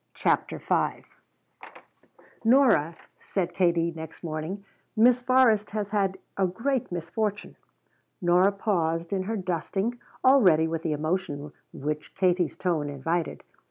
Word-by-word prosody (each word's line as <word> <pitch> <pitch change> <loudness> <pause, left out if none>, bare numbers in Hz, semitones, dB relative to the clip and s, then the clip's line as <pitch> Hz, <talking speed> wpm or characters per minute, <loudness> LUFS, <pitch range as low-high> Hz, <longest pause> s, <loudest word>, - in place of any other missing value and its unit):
CHAPTER - - 0
V - - -1 1.4
"Nora," 230 - +4 0.2
said 180 -3 -3
Katie 170 -2 +2
next 160 +1 -9
morning, 165 +5 -5 0.3
"Miss 245 +2 +5
Forrest 245 -5 +3
has 205 -1 -4
had 195 -2 0 0.2
a 190 -1 +2
great 235 +7 -2
misfortune." 205 +5 -3 0.6
Nora 180 +2 +4
paused 170 -4 -1
in 190 - 0
her 220 +4 -3
dusting, 195 +5 -2 0.2
all 265 +1 +6
ready 160 -5 +5
with 165 0 -3
the 160 -2 -1
emotion 150 -2 -3 0.2
which 150 +2 -5
Katie's 180 -3 +1
tone 165 -6 -1
invited. 160 +4 -2
185 Hz, 125 wpm, -26 LUFS, 165-210 Hz, 1.4 s, all